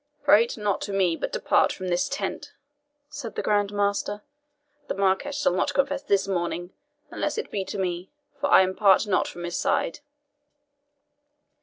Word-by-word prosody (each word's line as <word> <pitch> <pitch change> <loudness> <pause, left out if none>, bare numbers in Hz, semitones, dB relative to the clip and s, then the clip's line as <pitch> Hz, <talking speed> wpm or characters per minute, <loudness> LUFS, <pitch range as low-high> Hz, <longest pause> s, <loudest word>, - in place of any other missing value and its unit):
"Prate 230 +3 +4
not 210 -2 -1
to 205 - -4
me, 185 -4 +2
but - - -4
depart - - +2
from 185 -1 -5
this 175 0 0
tent," - - -4 0.5
said 290 -6 -7
the - - -2
Grand 205 -1 +1
Master; 205 0 -1 0.6
"the - - -3
Marquis 195 +8 +1
shall 290 -7 +1
not 185 - 0
confess 275 0 +1
this 200 -7 +1
morning, 175 -1 -2 0.4
unless - - -2
it 450 - -4
be 195 - -2
to - - -5
me, 180 -1 -3 0.3
for 285 0 -1
I 190 - +7
part 195 +1 +4
not 200 -3 +1
from 175 - -8
his 175 0 -3
side." 165 - 0
200 Hz, 165 wpm, -25 LUFS, 185-215 Hz, 0.6 s, I